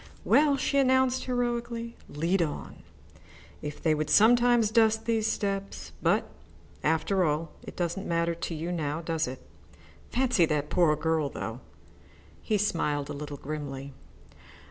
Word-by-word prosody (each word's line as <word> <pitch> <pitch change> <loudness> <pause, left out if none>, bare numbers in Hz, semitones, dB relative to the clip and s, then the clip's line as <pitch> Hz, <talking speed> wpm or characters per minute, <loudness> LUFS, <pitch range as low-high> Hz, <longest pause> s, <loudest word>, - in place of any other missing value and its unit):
"Well," 290 -1 +4
she 280 +1 +1
announced 260 -1 +3
heroically, 240 -2 -2
"lead 170 +6 0
on. 155 -3 -4 0.8
If 150 -1 -7
they 160 - +3
would 155 0 -2
sometimes 240 0 +5
dust 220 -1 +3
these 225 -1 +1
steps 195 -2 -3
but, - - +2 0.6
after 160 +5 +2
all, 155 +1 -1
it - - -10
doesn't 175 +2 -2
matter 170 0 +1
to 170 0 -5
you 165 +3 -4
now, 155 -2 -2
does 165 -2 -1
it? 130 +1 -8 0.6
Fancy 245 -9 +2
that 150 -1 -1
poor 170 -4 +4
girl, 160 -2 0
though." - - -5 0.8
He 215 - 0
smiled 150 -8 -1
a - - -4
little 145 0 -6
grimly. 140 -2 -6
175 Hz, 140 wpm, -28 LUFS, 155-230 Hz, 0.8 s, sometimes